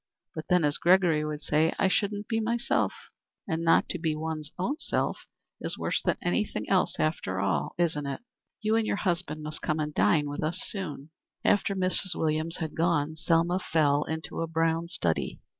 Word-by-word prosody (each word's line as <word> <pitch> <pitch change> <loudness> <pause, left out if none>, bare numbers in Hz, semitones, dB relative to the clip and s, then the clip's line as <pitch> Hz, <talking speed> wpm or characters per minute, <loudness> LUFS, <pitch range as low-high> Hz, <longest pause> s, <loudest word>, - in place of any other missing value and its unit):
But 155 - -6
then, 180 -2 +4
as 145 0 +1
Gregory 175 -4 +4
would 150 0 -4
say, 155 +3 +2
I 195 - +3
shouldn't 205 +2 0
be 225 -1 0
myself, 235 +2 +1 0.6
and 165 +1 -1
not 165 0 +4
to 180 - -3
be 160 -2 0
one's 155 -1 -4 0.3
self - - -2 0.3
is - - -2
worse - - -1
than - - 0
anything - - -1
else - - +2
after 95 - -1
all, 90 -8 0
isn't 160 -4 0
it? 140 - -4 0.4
You 215 +1 +2
and 225 -1 +1
your - - +1
husband 175 -6 -1
must 155 0 -5
come 155 0 -1
and 150 0 -2
dine 150 -1 +3
with 145 - -4
us 165 +4 -1
soon." 155 -9 -5 0.3
After 205 -1 +3
Mrs. 185 -1 +2
Williams 160 +1 -1
had 160 -2 -4
gone, 160 -2 +1
Selma 165 +2 +2
fell 150 -5 +2
into 160 +1 -4
a 165 - -1
brown 165 +1 0
study. 85 - -1
160 Hz, 180 wpm, -28 LUFS, 150-180 Hz, 0.6 s, then